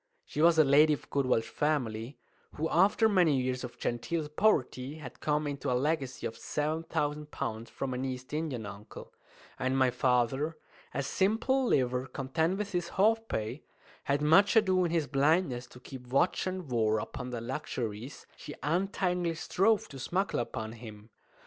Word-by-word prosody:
She - - -3
was 165 0 +6
a 155 - +8
lady 150 +2 +5
of 145 - -5
good 140 -2 +1
Welsh 115 -3 +2
family, 125 -4 -1 0.4
who 160 - -1
after 200 +6 +4
many 175 -9 +3
years 130 0 -2
of 125 - -7
genteel 150 +7 -2
poverty 150 - +1
had 145 -6 -10
come 150 0 0
into 140 -3 -2
a 125 - +2
legacy 140 -2 -1
of 110 - -3
seven 155 +6 -2
thousand 150 -2 -2
pounds 115 -3 -4
from 135 -2 -4
an 125 +1 -3
East 130 0 -5
Indian 150 -8 -2
uncle; 100 +1 -10 0.5
and 130 0 0
my 130 -1 +4
father 130 +5 +1 0.3
a 140 - -2
simple 225 - +1
liver, 125 - +1
content 160 +8 -1
with 205 0 -3
his 175 -2 -2
half 225 +3 +3
pay 110 +6 -3 0.4
had 140 +1 +1
much 190 +9 +5
ado 190 -4 +4
in - - 0
his 165 -2 +1
blindness 140 -3 +1
to 125 - -14
keep 125 -1 -10
watch 140 +9 +1
and 185 -6 -4
war 110 -2 +2
upon 125 +3 -5
the 120 -2 -4
luxuries 120 -1 -5
she 145 - -9
untiringly 180 +1 0
strove 200 +6 +1
to 135 - -9
smuggle 190 +9 -1
upon 110 -2 -4
him. 110 -2 -11
145 Hz, 170 wpm, -30 LUFS, 125-170 Hz, 0.5 s, a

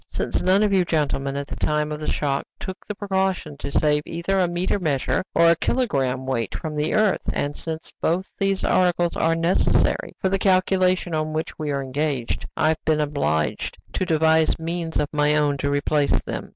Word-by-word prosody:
"Since - - -2
none 190 +3 +3
of 205 -2 +2
you 190 -2 +4
gentlemen, 140 -4 -1
at 140 0 -3
the - - -7
time 150 0 0
of 150 - -4
the 155 - -2
shock, 140 -2 -1
took 190 0 -8
the 210 - -4
precaution 190 -6 -1
to 140 - -5
save 150 0 +2
either 170 +4 -1
a 180 - +3
meter 175 +3 -1
measure 155 +1 0
or 170 - +6
a - - +4
kilogramme 135 - 0
weight 120 -5 -2
from 155 -2 -5
the 150 +1 0
earth, 215 -2 +2
and 145 0 -2
since 160 -1 -6
both 180 +4 -1
these 195 -1 0
articles 175 -1 +2
are 165 0 +2
necessary 165 +2 +1
for 190 - +1
the 195 +1 0
calculation 185 -2 +2
on 155 0 -1
which 155 +1 -3
we 155 -1 -2
are 140 -1 -1
engaged, 135 -2 -2
I 155 - +3
have 160 - -1
been 155 -1 +2
obliged 140 - -1 0.2
to - - -1
devise 160 -2 +3
means 165 0 -3
of 150 - +1
my 150 0 +2
own 145 -1 +2
to 140 +1 -1
replace 145 0 +1
them." - - -5
160 Hz, 200 wpm, -23 LUFS, 145-185 Hz, 0.2 s, or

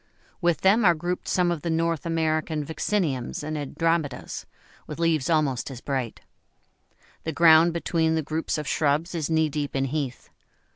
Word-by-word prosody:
With 175 -2 +1
them 205 +5 +4
are 175 -3 +5
grouped 175 +3 -4
some 180 -1 +2
of 170 -3 -3
the 170 - -3
North 165 0 0
American 155 -2 0
Vacciniums 160 - -2
and 155 +1 -4
Andromedas, 150 -1 -2 0.4
with 150 - -6
leaves 165 -4 +1
almost 145 -7 +1
as 130 -3 -8
bright. 130 -4 -3 1.0
The 160 - -2
ground 165 +1 +6
between 165 -1 0
the 160 - 0
groups 155 +2 -2
of 150 -2 -4
shrubs 155 +5 +1
is 160 -3 -2
knee 160 -1 +3
deep 145 -1 -3
in 135 0 +1
heath. 135 -2 -4
160 Hz, 160 wpm, -25 LUFS, 145-170 Hz, 1.0 s, ground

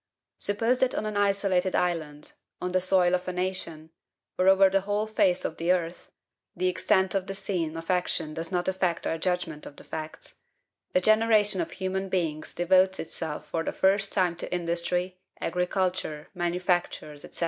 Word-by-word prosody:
"Suppose 225 +5 +1
that 260 -1 +2
on - - -2
an 215 -1 -3
isolated 195 -2 +1
island, 155 -4 -2 0.3
on 180 - -3
the 185 0 +2
soil 185 -1 +3
of 180 0 0
a - - -1
nation, 180 -3 -3 0.4
or 185 - +1
over 195 0 +7
the 195 +1 +2
whole 205 +2 -1
face 185 -4 +1
of 160 - -3
the 170 +2 +1
earth 175 -1 -2 0.5
(the 185 +1 0
extent 190 0 +2
of 195 -1 -1
the 195 - -4
scene 170 -5 -2
of 165 +2 -3
action 175 -3 0
does 165 +3 -4
not 180 -1 -1
affect 185 -2 0
our 165 - -1
judgment 180 -4 -2
of 145 - -11
the - - -14
facts), 155 0 -7 0.6
a 185 - +5
generation 215 -2 +4
of 165 - -3
human 190 0 -3
beings 165 -5 -2
devotes 185 +2 +3
itself 160 -2 -4
for 165 - -1
the - - -2
first 195 +1 +2
time 180 -3 +1
to - - -3
industry, 175 +1 -1 0.2
agriculture, 180 -3 -1
manufactures, 175 -4 -1
&c. - - -11
180 Hz, 175 wpm, -27 LUFS, 170-190 Hz, 0.6 s, over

